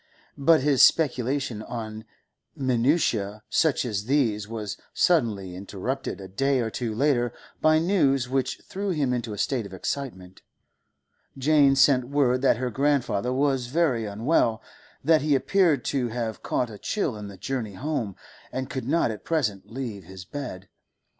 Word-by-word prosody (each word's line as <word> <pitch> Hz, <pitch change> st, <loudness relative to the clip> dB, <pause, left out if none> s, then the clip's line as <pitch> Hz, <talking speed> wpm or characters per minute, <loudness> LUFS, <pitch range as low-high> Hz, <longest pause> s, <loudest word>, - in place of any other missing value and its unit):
But 155 Hz, +2 st, +5 dB
his 140 Hz, -2 st, +3 dB
speculation 130 Hz, -5 st, +3 dB
on 110 Hz, -1 st, -6 dB, 0.5 s
minutiae 120 Hz, -, +1 dB
such 155 Hz, -5 st, +2 dB
as 105 Hz, -4 st, -2 dB
these 115 Hz, -6 st, +1 dB
was 105 Hz, -2 st, -5 dB, 0.2 s
suddenly 105 Hz, -, +1 dB
interrupted 100 Hz, +9 st, -4 dB
a 95 Hz, -, -8 dB
day 135 Hz, +8 st, +1 dB
or 115 Hz, -2 st, -1 dB
two 115 Hz, -2 st, -3 dB
later 120 Hz, -2 st, +2 dB, 0.3 s
by 155 Hz, 0 st, +5 dB
news 150 Hz, -7 st, +2 dB
which 130 Hz, 0 st, -1 dB
threw 200 Hz, +1 st, -4 dB
him 145 Hz, -8 st, 0 dB
into 120 Hz, -3 st, -3 dB
a 105 Hz, -, -5 dB
state 120 Hz, -1 st, -1 dB
of 95 Hz, -, -10 dB
excitement; 95 Hz, -4 st, -5 dB, 1.0 s
Jane 140 Hz, 0 st, +4 dB
sent 135 Hz, -2 st, +5 dB
word 130 Hz, -3 st, +2 dB
that 135 Hz, -4 st, +3 dB
her 125 Hz, 0 st, -2 dB
grandfather 130 Hz, -3 st, +1 dB
was 135 Hz, -2 st, +1 dB
very 130 Hz, -5 st, +1 dB
unwell, 110 Hz, +2 st, +1 dB, 0.4 s
that 155 Hz, +2 st, +4 dB
he 150 Hz, 0 st, +2 dB
appeared 160 Hz, -1 st, +2 dB
to 130 Hz, -3 st, +1 dB
have 115 Hz, -1 st, -4 dB
caught 120 Hz, -2 st, -1 dB
a 105 Hz, -, -10 dB
chill 180 Hz, -, -1 dB
in 105 Hz, -1 st, -7 dB
the 100 Hz, -1 st, -10 dB
journey 115 Hz, -1 st, -3 dB
home, 130 Hz, -, -3 dB, 0.4 s
and 130 Hz, 0 st, -4 dB
could 130 Hz, -3 st, -4 dB
not 155 Hz, -5 st, +2 dB
at 105 Hz, -, -8 dB
present 120 Hz, -, -1 dB
leave 115 Hz, -7 st, -5 dB
his 95 Hz, 0 st, -10 dB
bed. 100 Hz, -6 st, -7 dB
125 Hz, 155 wpm, -26 LUFS, 110-140 Hz, 1.0 s, But